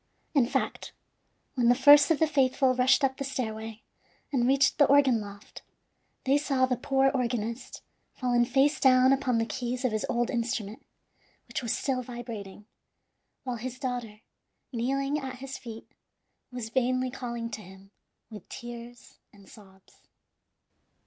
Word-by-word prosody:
In 270 Hz, -6 st, +3 dB
fact, -, -, -3 dB, 0.6 s
when 240 Hz, -2 st, +2 dB
the 245 Hz, -, +6 dB
first 290 Hz, +3 st, +7 dB
of 325 Hz, -, +3 dB
the 320 Hz, -, +3 dB
faithful 270 Hz, -3 st, +2 dB
rushed 255 Hz, +3 st, +3 dB
up 265 Hz, 0 st, +1 dB
the -, -, -3 dB
stairway, 225 Hz, -4 st, -5 dB, 0.5 s
and 245 Hz, -2 st, +2 dB
reached 275 Hz, +2 st, +3 dB
the 290 Hz, -, +7 dB
organ 270 Hz, -5 st, +4 dB
loft, 205 Hz, 0 st, -11 dB, 0.6 s
they 275 Hz, +2 st, +3 dB
saw 275 Hz, -3 st, +1 dB
the 255 Hz, -1 st, 0 dB
poor 270 Hz, +2 st, +2 dB
organist 235 Hz, -2 st, -3 dB, 0.3 s
fallen 245 Hz, -2 st, +2 dB
face 270 Hz, +4 st, +2 dB
down 260 Hz, -1 st, +5 dB
upon 260 Hz, -3 st, 0 dB
the 225 Hz, -, +1 dB
keys 250 Hz, +2 st, -3 dB
of 250 Hz, -, +2 dB
his 215 Hz, 0 st, -2 dB
old 240 Hz, 0 st, 0 dB
instrument, 235 Hz, -1 st, -3 dB, 0.6 s
which -, -, -4 dB
was 235 Hz, -3 st, -1 dB
still 265 Hz, -2 st, -1 dB
vibrating, 230 Hz, -5 st, -8 dB, 0.8 s
while 250 Hz, -3 st, -3 dB
his 255 Hz, +2 st, -6 dB
daughter, 245 Hz, -5 st, -5 dB, 0.5 s
kneeling 275 Hz, +5 st, -1 dB
at 265 Hz, -2 st, -6 dB
his 265 Hz, +1 st, -8 dB
feet, 230 Hz, -3 st, -9 dB, 0.7 s
was 245 Hz, -3 st, -6 dB
vainly 255 Hz, 0 st, 0 dB
calling 235 Hz, -3 st, -5 dB
to 215 Hz, -, -6 dB
him 190 Hz, +1 st, -15 dB, 0.4 s
with 210 Hz, -4 st, -11 dB
tears 240 Hz, -1 st, -10 dB
and 200 Hz, -1 st, -19 dB
sobs. 190 Hz, -4 st, -18 dB
250 Hz, 150 wpm, -28 LUFS, 230-270 Hz, 0.8 s, first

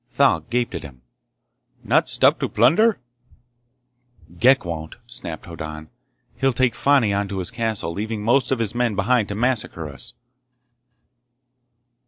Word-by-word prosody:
Thal 140 Hz, 0 st, +3 dB
gaped 120 Hz, -1 st, -2 dB
at 85 Hz, -, -4 dB
him. 65 Hz, -4 st, -12 dB, 0.8 s
"Not -, -, +2 dB
stop -, -, +3 dB
to -, -, -2 dB
plunder?" 170 Hz, -, +4 dB, 1.4 s
"Ghek 130 Hz, -1 st, +4 dB
won't!" 80 Hz, -2 st, -5 dB
snapped 115 Hz, -10 st, -7 dB
Hoddan. 80 Hz, -2 st, -8 dB, 0.5 s
"He'll 135 Hz, -1 st, +1 dB
take 125 Hz, -1 st, +2 dB
Fani 135 Hz, -6 st, +3 dB
on 100 Hz, 0 st, -1 dB
to 100 Hz, -, -5 dB
his 90 Hz, -2 st, -3 dB
castle, 110 Hz, -7 st, -2 dB
leaving 105 Hz, +2 st, -4 dB
most 125 Hz, +5 st, +2 dB
of 130 Hz, -, +2 dB
his 115 Hz, -2 st, -1 dB
men 120 Hz, -3 st, 0 dB
behind 110 Hz, +2 st, +2 dB
to 100 Hz, -, -4 dB
massacre 110 Hz, -8 st, -1 dB
us!" 70 Hz, -4 st, -9 dB
110 Hz, 140 wpm, -22 LUFS, 85-125 Hz, 1.4 s, plunder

